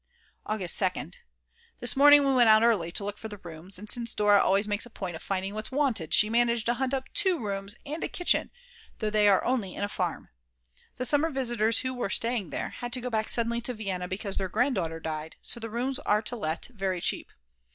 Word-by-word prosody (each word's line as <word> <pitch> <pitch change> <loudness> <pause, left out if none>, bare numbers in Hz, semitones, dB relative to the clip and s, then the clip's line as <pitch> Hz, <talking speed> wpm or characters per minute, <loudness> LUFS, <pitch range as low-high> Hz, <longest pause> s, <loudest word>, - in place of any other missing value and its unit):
August 195 -5 -1
2nd. 180 -3 -1 0.6
This 245 - +4
morning 290 +1 +7
we 275 - +2
went 245 -3 +5
out 215 +1 +6
early 200 -8 +2
to 200 - -1
look 205 0 -5
for 220 - -6
the 205 -1 -9
rooms, 175 +1 -7
and 210 +3 -9
since 235 +1 0
Dora 205 -1 +4
always 195 +2 +2
makes 210 +3 0
a - - -15
point 185 -6 -6
of - - -9
finding 195 0 -3
what's 215 +1 -6
wanted, 255 - +1
she 210 - +5
managed 235 0 +1
to 240 - +2
hunt 260 +1 -2
up 270 -1 -1
2 380 -4 +2
rooms 200 -3 -2
and 300 +3 -4
a - - 0
kitchen, 355 - +1 0.5
though 215 -2 -2
they 210 -1 +3
are 195 -2 +4
only 230 -8 -1
in - - -4
a - - 0
farm. 180 -4 -4 0.7
The 255 - -2
summer 290 +5 +2
visitors 240 -5 +1
who 255 0 -3
were 245 -5 -3
staying 230 -1 0
there - - -4
had 245 0 -7
to 250 - -1
go 250 0 -4
back 220 -1 0
suddenly 235 0 +1
to 245 +1 -2
Vienna 190 -4 -4
because 195 +1 -5
their 190 -1 -2
grandmother 180 - 0
died, 160 0 -5
and - - -27
so - - -1
the 225 0 -6
rooms 250 +4 -2
are 210 +1 +1
to 245 - 0
let 160 -7 -2
very 190 -4 -2
cheap. - - -1
215 Hz, 230 wpm, -28 LUFS, 195-245 Hz, 0.7 s, morning